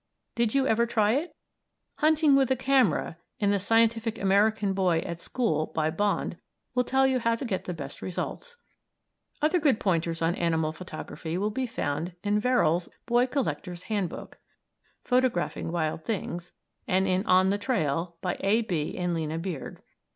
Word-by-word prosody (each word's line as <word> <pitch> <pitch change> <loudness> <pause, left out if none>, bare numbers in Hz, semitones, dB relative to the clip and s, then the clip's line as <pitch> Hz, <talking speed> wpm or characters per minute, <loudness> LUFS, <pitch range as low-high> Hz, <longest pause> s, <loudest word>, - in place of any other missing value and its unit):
Did 235 +1 0
you 270 -1 +3
ever 235 -1 +2
try 215 -3 +2
it? 295 +8 -1 0.6
"Hunting 305 -2 +4
with 270 -2 +3
a 260 - +3
Camera" 255 - +2 0.2
in 205 -1 +2
"The 200 - +2
Scientific 225 +2 +2
American 200 +1 +2
Boy 180 -4 +2
at 170 0 -5
School," 165 -9 -1
by 155 0 +1
Bond, 205 +4 -1 0.4
will 250 - +2
tell 265 +2 +2
you 260 -1 +2
how 230 -1 +1
to 250 - -5
get 195 -6 -2
the 180 - -3
best 140 -3 -8
results. 485 - -5 0.9
Other 325 +4 +3
good 285 -8 +3
pointers 165 -3 0
on 165 +1 +2
animal 160 -3 0
photography 170 -1 -6
will 205 +3 0
be 255 +4 -2
found 165 -4 -3
in 205 0 +2
Verrill's 195 -8 +2 0.2
"Boy 240 +1 +3
Collector's 190 -10 -3
Hand 205 -5 -1
Book" - - -10 0.6
("Photographing 250 -10 0
Wild 160 -2 -2
Things") 175 -4 -4 0.4
and 190 +1 +2
in 185 +1 +1
"On 185 +1 +5
the 205 - 0
Trail," 170 - -1
by 180 - -2
A. 220 +4 +2
B. 165 -8 -2
and 180 -1 -1
Lina 160 -1 -2
Beard. 165 -4 -6
200 Hz, 165 wpm, -27 LUFS, 170-240 Hz, 0.9 s, On